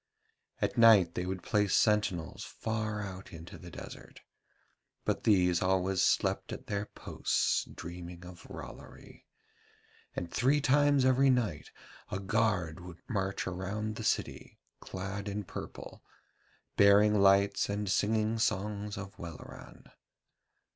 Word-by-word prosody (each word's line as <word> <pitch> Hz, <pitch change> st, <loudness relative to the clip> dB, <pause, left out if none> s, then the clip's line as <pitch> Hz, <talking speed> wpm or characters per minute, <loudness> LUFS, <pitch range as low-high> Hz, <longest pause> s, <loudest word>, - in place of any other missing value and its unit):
At -, -, -1 dB
night 105 Hz, -7 st, +7 dB
they 90 Hz, -, -3 dB
would 95 Hz, -1 st, -4 dB
place 105 Hz, 0 st, +2 dB
sentinels 105 Hz, -6 st, +1 dB
far 110 Hz, -1 st, -3 dB
out 95 Hz, -1 st, -8 dB
in 80 Hz, -2 st, -9 dB
the 90 Hz, 0 st, -11 dB
desert, -, -, -11 dB, 0.8 s
but -, -, -1 dB
these 90 Hz, -5 st, +4 dB
always 95 Hz, 0 st, +1 dB
slept -, -, +1 dB
at -, -, -7 dB
their 100 Hz, 0 st, -3 dB
posts -, -, -1 dB
dreaming 85 Hz, +1 st, -9 dB
of 90 Hz, -1 st, -12 dB
Rollory, -, -, -11 dB, 0.9 s
and 85 Hz, -, -4 dB
three 135 Hz, +5 st, +3 dB
times 145 Hz, -1 st, +3 dB
every 130 Hz, +1 st, +4 dB
night 115 Hz, -, 0 dB, 0.4 s
a -, -, -2 dB
guard 100 Hz, -5 st, 0 dB
would 90 Hz, -1 st, -10 dB
march 95 Hz, -2 st, -2 dB
around 100 Hz, +4 st, -3 dB
the 110 Hz, -, -6 dB
city -, -, -2 dB, 0.2 s
clad 100 Hz, +2 st, -5 dB
in 105 Hz, +1 st, -3 dB
purple, 90 Hz, -, -9 dB, 0.8 s
bearing 105 Hz, +1 st, +6 dB
lights 100 Hz, +1 st, +4 dB
and 100 Hz, 0 st, -2 dB
singing 110 Hz, +3 st, +1 dB
songs 105 Hz, 0 st, -1 dB
of 100 Hz, -1 st, -8 dB
Welleran. 85 Hz, -2 st, -10 dB
100 Hz, 125 wpm, -31 LUFS, 90-110 Hz, 0.9 s, night